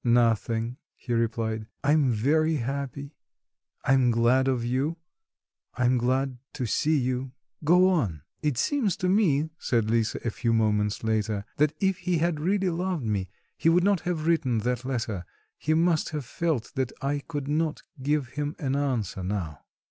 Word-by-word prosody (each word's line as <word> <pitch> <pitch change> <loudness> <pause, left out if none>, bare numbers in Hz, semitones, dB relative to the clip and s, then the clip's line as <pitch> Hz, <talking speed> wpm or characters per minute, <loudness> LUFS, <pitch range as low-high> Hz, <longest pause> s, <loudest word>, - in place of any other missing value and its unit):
"Nothing," 115 0 +2 0.2
he 120 - -5
replied; 110 -1 -1 0.2
"I'm 145 -1 +4
very 155 +8 +2
happy; 140 +2 -4 0.7
I'm 130 -2 +4
glad 120 +3 +3
of 125 -3 0
you, 135 +7 0 0.8
I'm 125 0 +2
glad 130 +1 0
to 130 - -3
see 150 +7 +2
you 130 0 -2 0.3
go 180 +4 +5
on." 110 - 0 0.2
"It 150 -5 0
seems 235 - +1
to 180 - -1
me," 160 -6 +2
said 115 -3 +1
Lisa 115 -1 +1
a 115 - +1
few 115 +1 0
moments 105 -2 +1
later, 110 -2 0
"that 150 +1 +3
if 195 -1 +1
he 180 -1 0
had 165 -1 0
really 190 +3 +1
loved 175 -4 -2
me, 100 -4 -1 0.3
he 165 - +2
would 175 +2 +4
not 200 -1 +3
have 165 -2 -2
written 150 -8 +2
that 125 +2 -1
letter; 110 -8 -2 0.4
he 155 +1 +1
must 165 -1 +2
have 150 -4 -4
felt 160 -3 -2
that 130 -3 -1
I 145 +1 0
could 145 -1 -5
not 155 +1 -1 0.2
give 145 -1 0
him 145 +3 -3
an 135 -4 -1
answer 125 -10 -1
now." 90 -6 -3
135 Hz, 165 wpm, -27 LUFS, 115-155 Hz, 0.8 s, go